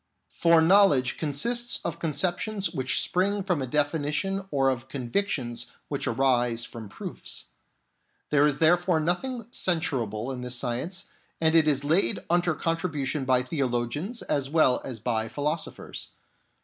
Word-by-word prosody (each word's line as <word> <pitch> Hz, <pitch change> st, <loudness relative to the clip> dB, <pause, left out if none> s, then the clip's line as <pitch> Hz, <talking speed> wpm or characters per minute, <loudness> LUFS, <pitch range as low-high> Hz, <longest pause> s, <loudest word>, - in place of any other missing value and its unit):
For 165 Hz, -1 st, +4 dB
knowledge 160 Hz, -8 st, +5 dB
consists 235 Hz, -, 0 dB
of 170 Hz, 0 st, -3 dB
conceptions 175 Hz, +5 st, 0 dB
which 130 Hz, -6 st, +1 dB
spring 200 Hz, +2 st, +1 dB
from 180 Hz, -6 st, 0 dB
a 130 Hz, -, -2 dB
definition 150 Hz, +7 st, 0 dB
or 135 Hz, -4 st, +2 dB
of 130 Hz, 0 st, -5 dB
convictions 125 Hz, -3 st, -2 dB, 0.2 s
which 140 Hz, -, -3 dB
arise 120 Hz, -2 st, +1 dB
from 110 Hz, -3 st, -9 dB
proofs. -, -, -6 dB, 0.9 s
There 150 Hz, 0 st, +5 dB
is 145 Hz, -1 st, 0 dB
therefore 175 Hz, +2 st, +3 dB
nothing 220 Hz, +9 st, -1 dB
censurable 130 Hz, -, -1 dB
in 125 Hz, -1 st, -5 dB
this 125 Hz, 0 st, -3 dB
science, 125 Hz, +10 st, -3 dB, 0.3 s
and 160 Hz, 0 st, +3 dB
it 160 Hz, -2 st, +5 dB
is 140 Hz, -2 st, +2 dB
laid 150 Hz, -4 st, +3 dB
under 175 Hz, -2 st, +2 dB
contribution 155 Hz, -4 st, -2 dB
by 130 Hz, -1 st, +3 dB
theologians 135 Hz, -, -2 dB
as 135 Hz, -2 st, -1 dB
well 145 Hz, -5 st, +3 dB
as 125 Hz, -4 st, -6 dB
by 110 Hz, 0 st, -1 dB
philosophers. 150 Hz, +5 st, -4 dB
150 Hz, 135 wpm, -27 LUFS, 130-175 Hz, 0.9 s, knowledge